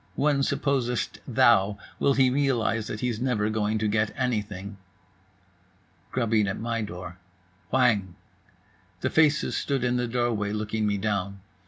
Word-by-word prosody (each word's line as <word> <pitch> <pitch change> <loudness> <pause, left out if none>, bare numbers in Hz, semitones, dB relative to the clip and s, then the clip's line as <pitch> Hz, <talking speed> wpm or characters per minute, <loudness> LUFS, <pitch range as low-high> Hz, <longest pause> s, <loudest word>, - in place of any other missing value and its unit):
When 145 -1 +2
supposest 130 -3 -1
thou 100 +1 +4 0.2
will 140 - +3
he 130 -1 +4
realize 120 -5 +1
that 105 - -5
he's 120 -2 -2
never 110 -5 0
going 110 0 0
to 110 0 0
get 105 0 +1
anything?" 105 -6 -3 1.3
Grubbing 115 -4 +1
at 100 - -3
my 115 0 -2
door. 90 -3 -7 0.5
Whang! 110 -8 +2 0.9
The - - -1
faces 155 -1 +3
stood 135 -3 -1
in 125 0 +1
the 125 0 -1
doorway, 115 -4 -1
looking 105 0 -1
me 100 -1 0
down. 100 -1 -2
110 Hz, 140 wpm, -26 LUFS, 105-125 Hz, 1.3 s, thou